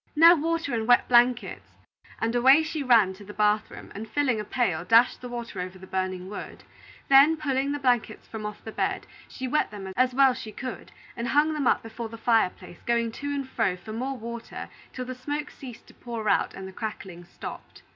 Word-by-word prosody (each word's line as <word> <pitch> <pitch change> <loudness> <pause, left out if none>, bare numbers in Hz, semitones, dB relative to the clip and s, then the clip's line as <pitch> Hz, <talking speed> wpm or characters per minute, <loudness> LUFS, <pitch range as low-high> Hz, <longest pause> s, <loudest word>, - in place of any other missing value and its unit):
"Now 330 +3 +9
water 330 -3 -1
and 225 -1 -1
wet 245 0 +5
blankets," 245 0 +2 0.5
and 225 +1 0
away 265 +6 +6
she 310 0 -4
ran 230 -8 +4
to 190 - -13
the 210 +1 -11
bath 210 0 +2
room, - - -11
and 215 +2 -7
filling 260 -3 +1
a - - -2
pail, 195 -7 -1
dashed 230 +6 +4
the 250 - -7
water 235 -5 -5
over 185 +1 -6
the 190 - -12
burning 185 -1 -3
wood. 205 - -8 0.4
Then, 280 +4 +7
pulling 275 -2 -1
the 290 - -1
blankets 250 -4 0
from 220 -1 -7
off 210 0 -6
the 220 - -7
bed, - - -2 0.2
she 260 - -6
wet 300 +4 +1
them 195 -2 -8
as 255 0 +2
well 270 -1 +6
as - - -6
she 215 - -8
could, 255 +1 -7 0.2
and 235 0 -3
hung 295 +3 +3
them 290 -4 -1
up - - +2
before 225 0 -6
the 230 - -9
fire 225 -4 +3
place, 175 - -14
going 235 -1 +1
to 285 +5 -7
and 280 -2 -2
fro 185 -7 0
for 215 +4 -9
more 260 +4 -3
water 235 0 -7 0.2
till 255 - -5
the 255 - -5
smoke 290 +4 -4
ceased 250 -4 -11
to - - -18
pour 230 -3 -6
out - - +2
and 190 0 -7
the 190 - -10
crackling 190 -5 -6
stopped. 175 - -10
235 Hz, 220 wpm, -26 LUFS, 210-270 Hz, 0.5 s, Now